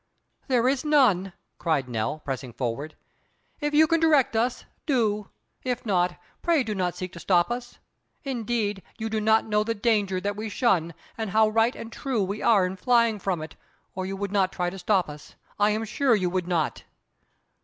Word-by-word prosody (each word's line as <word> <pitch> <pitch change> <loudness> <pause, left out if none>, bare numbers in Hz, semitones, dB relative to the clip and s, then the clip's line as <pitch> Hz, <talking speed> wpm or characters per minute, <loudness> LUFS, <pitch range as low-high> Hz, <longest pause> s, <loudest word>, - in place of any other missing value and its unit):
"There 250 -3 +2
is 265 0 +1
none," 245 - +3 0.3
cried 155 -6 0
Nell, 120 +6 -3
pressing 130 -3 -4
forward. 135 +6 -4 0.6
"If 295 -1 -1
you 315 +1 +7
can 330 +1 +2
direct 300 -7 +3
us, 240 +3 0 0.2
do. 215 -7 +1 0.3
If 250 -2 -3
not, 180 -4 +1 0.2
pray 335 -5 +2
do 220 -3 -3
not 180 -3 -1
seek 185 0 -6
to - - -9
stop 180 +2 +2
us. 245 0 -5 0.5
Indeed, 230 -6 -2 0.2
you 225 -1 -4
do 220 -1 0
not 220 +1 +3
know 210 -1 +1
the 230 +1 -2
danger 205 -4 +1
that 205 +2 -2
we 215 +1 -4
shun, 180 - +1 0.2
and 220 -2 -2
how 220 +2 +4
right 225 +3 +2
and 230 - -8
true 250 -6 -1
we 200 +3 -3
are 205 -5 +4
in 185 +1 -4
flying 230 -1 +3
from 180 -4 -2
it, 155 - -9 0.4
or 185 0 -4
you 195 - -4
would 200 0 -3
not 195 -2 +2
try 180 -2 -2
to 195 - -8
stop 185 0 +2
us; 150 0 -11 0.2
I 205 +1 +4
am 215 +1 -1
sure 250 +2 +2
you 185 -4 0
would 185 -1 -1
not." 170 -4 -1
210 Hz, 195 wpm, -26 LUFS, 180-235 Hz, 0.6 s, you